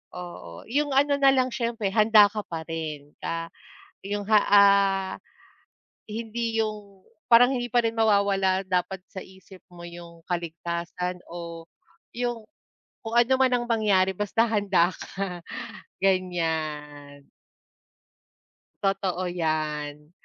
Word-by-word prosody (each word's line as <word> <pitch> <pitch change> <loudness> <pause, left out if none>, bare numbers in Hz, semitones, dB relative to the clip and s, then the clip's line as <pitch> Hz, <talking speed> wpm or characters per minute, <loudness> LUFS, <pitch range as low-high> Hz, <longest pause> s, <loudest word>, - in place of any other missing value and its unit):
Oo, 175 - -9
yung 290 +1 0
ano 285 +1 +3
na 275 -1 +6
lang, 255 -1 +1
siyempre 230 -5 -2
handa 215 0 +6
ka 215 - -4
pa 165 -1 -5
rin 155 -3 -5
na 165 0 -4 0.5
yung, 205 +1 -2
ha, 215 - +7
ah, 200 -1 +5 0.9
hindi 225 +1 -2
yung 205 -3 -7 0.2
parang 245 +1 +7
hindi 245 -2 -2
pa 240 0 +3
rin 225 - +1
mawawala 200 -3 +2
dapat 185 +1 -1
sa 190 - -6
isip 190 0 -16
mo 175 -1 -12
yung 170 -1 -12
kaligtasan 170 +1 -4
o 170 -1 -8 0.5
'yung 240 -2 -2 0.6
kung 225 - -5
ano 240 +2 +4
man 260 -1 +3
ang 240 -1 +1
mangyari, 200 -4 +2
basta 210 +3 +1
handa 195 -5 +2
ka, 185 -3 -6 0.6
ganyan. 155 -6 -2 1.6
Totoo 190 -2 -1
yan. 150 -3 -3
190 Hz, 120 wpm, -26 LUFS, 170-225 Hz, 1.6 s, ha